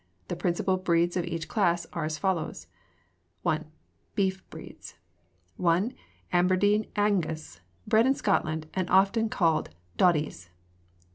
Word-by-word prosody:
The - - -2
principal 185 +2 0
breeds 175 -2 +1
of 175 -2 0
each 165 -2 -4
class 175 -5 +1
are 165 -3 -2
as 155 0 -3
follows: 165 -2 -2 0.8
I. 155 - +2 0.6
Beef 190 -1 0
Breeds - - -11 0.6
1. 180 +8 +2 0.4
Aberdeen 185 +4 +3
Angus, 160 - -1 0.2
bred 225 +3 +4
in 270 - +3
Scotland, 160 -8 0
and 185 -2 -2
often 200 +4 +3
called 165 -6 +1 0.3
doddies. 150 - +2
180 Hz, 120 wpm, -28 LUFS, 165-195 Hz, 0.8 s, bred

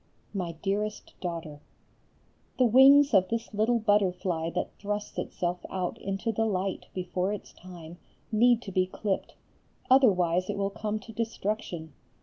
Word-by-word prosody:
MY 180 -4 -3
DEAREST 210 +2 -2
DAUGHTER, 165 -4 -5 1.0
The 255 - +4
wings 270 +4 +7
of 185 -2 +5
this 230 -1 -3
little 220 +3 +2
butterfly 185 -6 +1
that - - -2
thrusts 205 0 -4
itself 180 0 -3
out 185 -2 -3
into 195 +4 -2
the 225 +1 0
light 190 -2 -2
before 185 +1 -1
its 210 - -7
time 175 -1 -11 0.3
need 240 +2 +4
to 195 - -7
be 185 0 +1
clipped; 195 +1 -3 0.6
otherwise 185 -9 +4
it 205 - -2
will 200 0 -1
come 215 +1 -3
to 225 - -11
destruction. 210 -8 -3
195 Hz, 140 wpm, -28 LUFS, 180-220 Hz, 1.0 s, wings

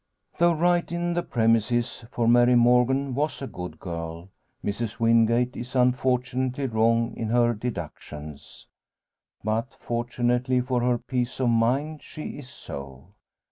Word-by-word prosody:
Though 170 0 +5
right 175 +2 +1
in 175 0 -1
the 175 - 0
premises 115 0 +1
for 115 -1 -1
Mary 120 +1 +5
Morgan 125 +3 +3
was 150 +4 -1
a 135 - -4
good 90 -9 -7
girl 85 0 -6 0.4
Mrs 105 +1 -3
Wingate 115 +2 +3
is 125 +2 -7
unfortunately 125 +1 +1
wrong 115 -1 +2
in 115 - -3
her 120 0 +3
deductions. 75 - -7 0.8
But, 110 +4 -2
fortunately 120 +1 0
for 125 -1 0
her 125 0 +2
peace 125 +1 -3
of 125 -2 +2
mind, 130 +7 +1
she 155 - -8
is 130 -3 -11
so. 70 - -9
120 Hz, 135 wpm, -25 LUFS, 115-130 Hz, 0.8 s, Though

